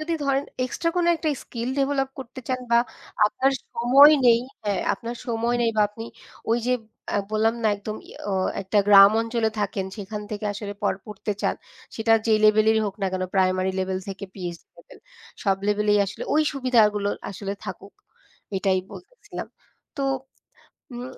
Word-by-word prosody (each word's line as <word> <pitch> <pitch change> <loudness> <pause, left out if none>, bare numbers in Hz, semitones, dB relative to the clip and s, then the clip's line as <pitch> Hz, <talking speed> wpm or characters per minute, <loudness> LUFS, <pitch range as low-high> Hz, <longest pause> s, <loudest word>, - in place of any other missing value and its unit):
যদি 330 +2 -3
ধরেন 275 0 +1 0.2
এক্সট্রা 335 +7 -1
কোনো 345 -1 +2
একটা 320 0 -2 0.2
স্কিল 235 0 -5
ডেভেলপ 275 -1 +1
করতে 260 0 -8
চান 255 0 -1
বা 235 - +7 0.5
আপনার 270 +5 +1 0.2
সময় 270 +6 +7
নেই 235 -1 +6 0.2
হ্যাঁ, 205 -2 0
আপনার 235 +1 -7
সময় 235 0 0
নেই 230 - +2
বা 210 - +5
আপনি 225 +2 -9 0.5
ওই 230 - +3
যে 250 - +2 0.4
আ - - +3
বললাম 220 +1 +2
না 220 - +3
একদম 210 +1 -6 0.3
ও - - -1 0.3
একটা 195 +2 +1
গ্রাম 200 -1 +9
অঞ্চলে 230 -1 0
থাকেন 195 -1 -2
সেখান 210 0 -6
থেকে 210 0 -5
আসলে 205 0 -6
পড় 200 - +1
পড়তে 210 0 -4
চান। - - +1 0.4
সেটা 225 0 +2
যেই 220 -1 +4
লেভেলেরই 215 +1 +5
হোক 195 - -4
না - - +2
কেন, 185 - -2
প্রাইমারি 185 0 +2
লেভেল 185 0 -1
থেকে 195 +1 -6
PhD 175 -3 -6
লেভেল - - -16 0.5
সব 195 -2 +3
লেভেলেই 210 0 +3
আসলে 210 - -6
ওই 310 - +4
সুবিধাগুলো 220 -7 +2 0.2
আসলে 200 0 -5
থাকুক, - - -8 0.6
এটাই 190 0 +2
বলতেছিলাম। - - -9 0.5
তো 280 - -2 0.9
উম 245 0 -6
220 Hz, 165 wpm, -24 LUFS, 200-245 Hz, 0.9 s, গ্রাম